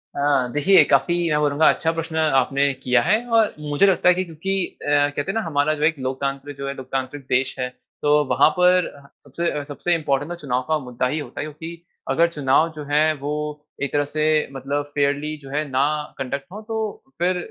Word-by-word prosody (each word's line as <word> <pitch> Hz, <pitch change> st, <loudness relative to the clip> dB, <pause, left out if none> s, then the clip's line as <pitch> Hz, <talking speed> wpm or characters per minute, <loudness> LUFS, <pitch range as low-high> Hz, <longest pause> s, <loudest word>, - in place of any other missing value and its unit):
अ, 140 Hz, -3 st, +2 dB
देखिये 165 Hz, +4 st, +6 dB
काफ़ी 145 Hz, +6 st, +2 dB
मैं 150 Hz, -1 st, +2 dB
बोलूँगा 150 Hz, +1 st, +3 dB
अच्छा 165 Hz, -, -1 dB
प्रश्न 165 Hz, 0 st, -5 dB, 0.2 s
आपने 140 Hz, +2 st, +1 dB
किया 125 Hz, -2 st, +3 dB
है 190 Hz, -, +3 dB, 0.2 s
और 225 Hz, -2 st, +4 dB
मुझे 150 Hz, +5 st, +2 dB
लगता 190 Hz, -2 st, +2 dB
है -, -, +7 dB
कि 185 Hz, -, 0 dB
क्योंकि 185 Hz, +3 st, -2 dB
अ, -, -, -13 dB
कहते 145 Hz, 0 st, +2 dB
है -, -, -8 dB
ना 225 Hz, -, 0 dB
हमारा 155 Hz, -4 st, +1 dB
जो 150 Hz, -, -4 dB
एक 160 Hz, +1 st, +3 dB
लोकतंत्र, 135 Hz, +2 st, -3 dB
जो 140 Hz, 0 st, -5 dB
है 140 Hz, -, -2 dB
लोकतांत्रिक 130 Hz, +1 st, -4 dB
देश 130 Hz, +1 st, +1 dB
है। 125 Hz, -, -1 dB, 0.3 s
तो 150 Hz, 0 st, +4 dB
वहाँ 130 Hz, +4 st, +5 dB
पर 180 Hz, 0 st, +4 dB, 0.4 s
सबसे 150 Hz, +1 st, -2 dB
सबसे 155 Hz, +4 st, -1 dB
इंपॉर्टेंट 145 Hz, -1 st, -1 dB
न -, -, -3 dB
चुनाव 130 Hz, -6 st, -2 dB
का 155 Hz, -, +2 dB
मुद्दा 125 Hz, -2 st, -2 dB
ही 150 Hz, +5 st, -2 dB
होता 130 Hz, -4 st, -8 dB
है -, -, -3 dB
क्योंकि, 160 Hz, +3 st, -9 dB, 0.3 s
अगर 165 Hz, +6 st, +4 dB
चुनाव 150 Hz, +1 st, +2 dB
जो 150 Hz, -, -6 dB
है 150 Hz, +2 st, +3 dB
वो 145 Hz, +1 st, -5 dB, 0.5 s
एक 140 Hz, -, -2 dB
तरह 145 Hz, 0 st, +2 dB
से 155 Hz, +1 st, +1 dB
मतलब 140 Hz, +2 st, -2 dB
फ़ेयरली 145 Hz, +1 st, 0 dB
जो 135 Hz, -, -11 dB
है 150 Hz, +3 st, -1 dB
ना 130 Hz, +1 st, +2 dB, 0.3 s
कंडक्ट 135 Hz, +1 st, -4 dB
हो 210 Hz, +3 st, -8 dB
तो 225 Hz, -1 st, -3 dB, 0.4 s
फिर 180 Hz, +1 st, +1 dB
145 Hz, 205 wpm, -22 LUFS, 140-165 Hz, 0.5 s, है